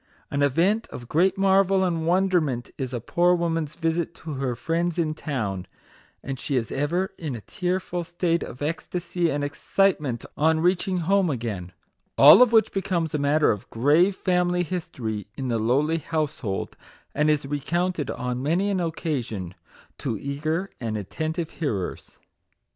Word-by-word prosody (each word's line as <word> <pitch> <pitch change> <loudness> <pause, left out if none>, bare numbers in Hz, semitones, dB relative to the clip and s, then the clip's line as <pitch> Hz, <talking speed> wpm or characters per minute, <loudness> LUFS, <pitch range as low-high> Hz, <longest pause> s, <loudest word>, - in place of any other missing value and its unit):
An 145 - 0
event 175 - +2
of 120 - -9
great 180 - +2
marvel 195 0 +4
and 165 -3 0
wonder 185 0 +3
ment 125 -5 -3
is 130 -3 -4
a 125 - -2
poor 175 +9 +2
woman's 165 -3 -1
visit 165 0 -1
to 155 -2 -7
her 130 -3 -2
friends 170 +6 -1
in 160 -3 +1
town, 110 - -3 0.6
and 135 -1 -5
she 140 - -2
is 115 -3 -1
ever 170 +7 -1
in 150 -6 -4
a 115 - -7
tearful 180 - -2
state 170 0 0
of 125 - -6
ecstasy 170 +2 -2
and 145 -1 -1
excitement 145 - 0
on 160 +1 +3
reaching 180 +1 +1
home 195 -1 +3
again; 110 - -4 0.5
all 145 - +10
of 250 -2 +6
which 225 -1 +4
becomes 175 -4 -1
a 150 - 0
matter 145 +2 +3
of 105 -2 -5
grave 155 - +3
family 180 -1 +1
history 125 - -4
in 130 -2 -3
the 115 -1 +1
lowly 145 +9 +2
household, 155 -11 -3 0.4
and 150 +1 +2
is 150 -2 +2
recounted 155 +3 -1
on 125 0 -3
many 175 +8 +1
an 190 - 0
occasion 130 - -3 0.5
to 115 -5 -2
eager 155 - -2
and 110 -3 -2
attentive 160 - -3
hearers. 105 - -4
160 Hz, 160 wpm, -25 LUFS, 135-175 Hz, 0.6 s, all